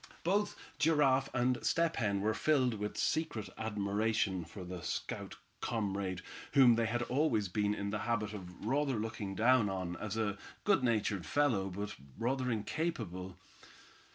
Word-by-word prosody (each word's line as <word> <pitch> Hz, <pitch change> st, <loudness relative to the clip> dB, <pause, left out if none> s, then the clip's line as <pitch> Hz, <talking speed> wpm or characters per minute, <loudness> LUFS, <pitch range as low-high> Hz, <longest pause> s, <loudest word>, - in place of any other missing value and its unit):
Both 205 Hz, +4 st, +1 dB, 0.2 s
Giraffe 140 Hz, -4 st, +4 dB
and 125 Hz, 0 st, +1 dB
Step 165 Hz, -1 st, +2 dB
Hen 100 Hz, -3 st, +1 dB
were 110 Hz, +2 st, +2 dB
filled 130 Hz, +2 st, +2 dB
with 105 Hz, -1 st, -4 dB
secret 155 Hz, -10 st, 0 dB
admiration 105 Hz, -2 st, 0 dB
for 90 Hz, +3 st, -9 dB
the 90 Hz, 0 st, -6 dB
stout -, -, -4 dB, 0.3 s
comrade 100 Hz, -4 st, -2 dB, 0.3 s
whom 130 Hz, -4 st, +8 dB
they 115 Hz, 0 st, +2 dB
had 120 Hz, +2 st, 0 dB
always 125 Hz, -6 st, +1 dB
been 105 Hz, +2 st, +1 dB
in 100 Hz, -1 st, -3 dB
the 105 Hz, -, -1 dB
habit 105 Hz, -2 st, -1 dB
of 90 Hz, -1 st, -8 dB
rather 135 Hz, +2 st, +1 dB
looking 105 Hz, -3 st, -3 dB
down 115 Hz, -1 st, +4 dB
on 90 Hz, -2 st, -3 dB
as 110 Hz, 0 st, -4 dB
a 105 Hz, -2 st, -1 dB, 0.2 s
good 195 Hz, -10 st, +3 dB
natured 105 Hz, -7 st, +1 dB
fellow, 115 Hz, -, +2 dB
but 100 Hz, +3 st, -4 dB, 0.2 s
rather 125 Hz, +3 st, 0 dB
incapable. 110 Hz, -, -3 dB
110 Hz, 150 wpm, -34 LUFS, 100-130 Hz, 0.3 s, whom